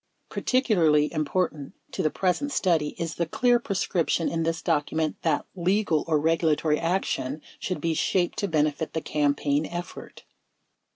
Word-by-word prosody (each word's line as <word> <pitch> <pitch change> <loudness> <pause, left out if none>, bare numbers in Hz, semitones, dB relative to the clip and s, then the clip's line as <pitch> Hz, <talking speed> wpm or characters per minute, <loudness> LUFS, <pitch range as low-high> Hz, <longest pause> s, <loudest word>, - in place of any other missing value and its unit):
Particularly 170 - +2
important 155 -2 -2 0.2
to - - -2
the 155 - +2
present 190 - 0
study 165 - +1
is 165 -1 -3
the 170 - -2
clear 245 +7 +3
prescrip 190 -6 -1
tion 165 - +1
in 165 - -2
this 165 0 -1
document 155 +1 0
that 160 -3 0
"legal 185 -3 +1
or 155 -2 +2
regulatory 160 -1 +2
action" 165 -5 -1 0.2
should 185 - -3
be 165 -1 0
shaped 175 +2 0
to 200 - 0
benefit 155 -2 0
the 160 - -1
campaign 145 0 +1
effort. 175 +1 -8
165 Hz, 150 wpm, -26 LUFS, 150-180 Hz, 0.2 s, clear